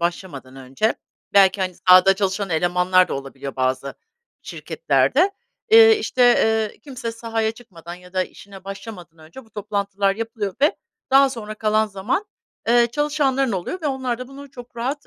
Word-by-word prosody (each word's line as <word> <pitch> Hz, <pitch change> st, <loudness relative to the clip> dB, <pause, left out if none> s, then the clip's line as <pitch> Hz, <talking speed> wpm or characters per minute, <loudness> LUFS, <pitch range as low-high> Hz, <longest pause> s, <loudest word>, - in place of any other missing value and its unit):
başlamadan 170 Hz, -7 st, -5 dB
önce 135 Hz, -, -1 dB, 0.4 s
belki, 195 Hz, 0 st, +5 dB
hani, 185 Hz, -1 st, -2 dB
sahada 185 Hz, +1 st, +7 dB
çalışan 195 Hz, 0 st, -2 dB
elemanlar 180 Hz, +2 st, +2 dB
da -, -, -3 dB
olabiliyor 135 Hz, 0 st, -7 dB
bazı 130 Hz, +1 st, -1 dB, 0.5 s
şirketlerde, 400 Hz, -5 st, 0 dB, 0.4 s
eee, 450 Hz, -1 st, +8 dB
işte, 255 Hz, -, -1 dB
eee, 220 Hz, -3 st, +3 dB
kimse 255 Hz, -5 st, -6 dB
sahaya 225 Hz, -1 st, -2 dB
çıkmadan 175 Hz, -8 st, -12 dB
ya 180 Hz, +1 st, -16 dB
da 185 Hz, -, +1 dB
işine 195 Hz, -1 st, -14 dB
başlamadan 195 Hz, -5 st, -10 dB
önce 165 Hz, +12 st, -13 dB
bu 220 Hz, -, -25 dB
toplantılar 200 Hz, -2 st, -2 dB
yapılıyor 225 Hz, -4 st, -4 dB
ve 295 Hz, +3 st, +3 dB, 0.3 s
daha 270 Hz, 0 st, +5 dB
sonra 215 Hz, -4 st, -7 dB
kalan 215 Hz, 0 st, +1 dB
zaman, 210 Hz, -, -2 dB, 0.4 s
eee, 240 Hz, 0 st, +5 dB
çalışanların 280 Hz, -4 st, 0 dB
oluyor 190 Hz, -, -4 dB
ve 305 Hz, -, -1 dB
onlar 260 Hz, -3 st, -2 dB
da 255 Hz, -, -8 dB
bunu 275 Hz, +1 st, -12 dB
çok 245 Hz, -2 st, -13 dB
rahat, 270 Hz, +5 st, -4 dB
210 Hz, 155 wpm, -21 LUFS, 185-250 Hz, 0.5 s, eee